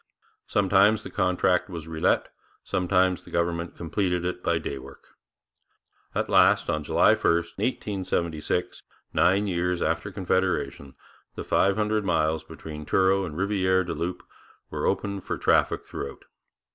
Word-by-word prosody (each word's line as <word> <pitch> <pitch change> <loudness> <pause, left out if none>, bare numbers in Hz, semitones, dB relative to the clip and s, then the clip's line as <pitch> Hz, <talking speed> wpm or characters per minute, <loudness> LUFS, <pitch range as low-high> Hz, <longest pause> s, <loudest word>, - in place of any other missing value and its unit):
Sometimes 100 +2 +3
the - - -8
contract 90 +1 +1
was 85 -3 -7
relet, 80 -1 +1 0.4
sometimes 90 0 +1
the - - -15
government 85 0 -2
completed 90 +1 -1
it 90 0 -3
by 85 -2 +1
day 70 -4 -4
work. 70 +1 -14 1.1
At - - 0
last, - - +4
on 75 0 -2
July - - +4
1, - - 0
1876, 85 -2 -1 0.3
nine 95 +4 +3
years 90 -2 0
after 85 +4 -1
Confederation, 95 -7 -1 0.4
the - - -5
five 95 0 +2
hundred 105 0 0
miles 80 -4 +1
between 75 -1 -9
Truro 95 +4 +2
and 75 -4 -7
Rivière 95 0 +1
du 85 - -3
Loup 90 +2 -4 0.5
were 75 -1 -1
opened 100 0 -1
for - - -3
traffic - - +2
throughout. 70 - -7
90 Hz, 135 wpm, -26 LUFS, 85-95 Hz, 1.1 s, last